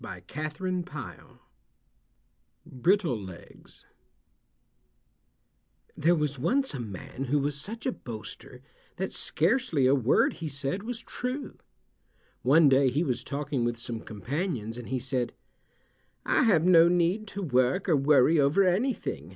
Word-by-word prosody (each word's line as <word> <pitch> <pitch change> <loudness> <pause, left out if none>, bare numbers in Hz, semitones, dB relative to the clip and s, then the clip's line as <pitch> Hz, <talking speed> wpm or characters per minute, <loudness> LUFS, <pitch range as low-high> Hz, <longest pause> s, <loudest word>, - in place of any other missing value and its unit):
BRITTLE 170 - +2
LEGS 95 -3 -12 2.1
There 170 +3 +3
was 150 -4 -2
once 265 - +1
a 135 - -5
man 125 +5 -6
who 140 +3 +1
was 145 0 -1
such 225 +8 -7
a 260 - +1
boaster 125 - -9 0.3
that 190 +1 -4
scarcely 175 - +1
a 130 - +5
word 130 -2 +3
he 165 - -6
said 145 +6 -3
was 230 +1 -5
true. 255 +3 -5 0.8
One 150 +4 +5
day 135 0 +4
he 145 +7 0
was 130 -7 -2
talking 140 -3 -3
with 120 0 -1
some 115 -1 -4
companions 115 - -4
and 120 - -9
he 130 - -1
said, 130 -1 -2 0.9
"I - - +3
have 170 -8 +4
no 170 -2 +7
need 180 +5 +1
to 200 0 -5
work 130 +4 +1
or 165 - +4
worry 145 +2 +4
over 145 +8 +4
anything. 185 - -1
145 Hz, 125 wpm, -28 LUFS, 130-185 Hz, 2.1 s, no